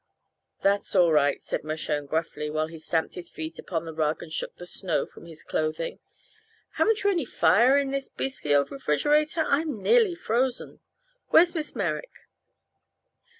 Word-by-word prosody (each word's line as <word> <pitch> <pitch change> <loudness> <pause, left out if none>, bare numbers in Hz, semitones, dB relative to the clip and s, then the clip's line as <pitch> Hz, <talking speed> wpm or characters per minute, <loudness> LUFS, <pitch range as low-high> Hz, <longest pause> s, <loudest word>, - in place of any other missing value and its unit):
"That's 200 +1 +1
all 175 -3 +5
right," 145 -2 +2
said - - -3
Mershone 155 -1 -3
gruffly, 155 -1 -2
while 155 +1 0
he 160 0 -10
stamped 160 +1 -1
his 175 -1 -8
feet 160 +1 -7
upon 165 -2 -3
the 160 - -6
rug 155 0 -1
and 155 - -10
shook - - -4
the 175 - -9
snow 180 -2 -2
from - - -15
his 160 -2 -11
clothing. 155 +1 -2 0.7
"Haven't 440 -2 +1
you 405 - +4
any 345 -5 0
fire 250 +2 +4
in 280 -1 0
this 275 0 -3
beastly 150 - -1
old 140 0 +2
refrigerator? 295 - +1
I'm 290 -4 0
nearly 450 - +4
frozen. 250 -2 -1 0.5
Where's 345 +1 +5
Miss 310 -4 -4
Merrick?" - - -4
180 Hz, 160 wpm, -26 LUFS, -, 0.7 s, all